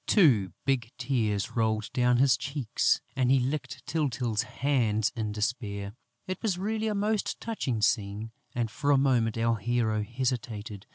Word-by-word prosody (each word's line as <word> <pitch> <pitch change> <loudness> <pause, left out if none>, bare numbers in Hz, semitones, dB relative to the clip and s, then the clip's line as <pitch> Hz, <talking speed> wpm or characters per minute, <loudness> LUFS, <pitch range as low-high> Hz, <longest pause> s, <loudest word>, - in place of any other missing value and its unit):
Two 120 - +5
big 130 -4 +1
tears 110 -7 0
rolled 110 -2 0
down 125 -1 +3
his 130 -1 +5
cheeks; 135 0 0
and 130 -2 +2
he 135 0 +5
licked 135 +4 -3
Tyltyl's 125 -8 0
hands 115 -6 +1
in 110 -3 -2
despair. 105 -2 -3 0.3
It 185 -1 -4
was 200 -5 0
really 215 +3 -1
a 210 - 0
most 210 +1 0
touching 130 - -2
scene; 105 +1 0 0.2
and 115 -2 -1
for 140 - -2
a 145 - +6
moment, 120 -5 +2
our 115 0 +2
hero 110 0 0
hesitated. 115 -3 -3
120 Hz, 155 wpm, -28 LUFS, 110-140 Hz, 0.3 s, a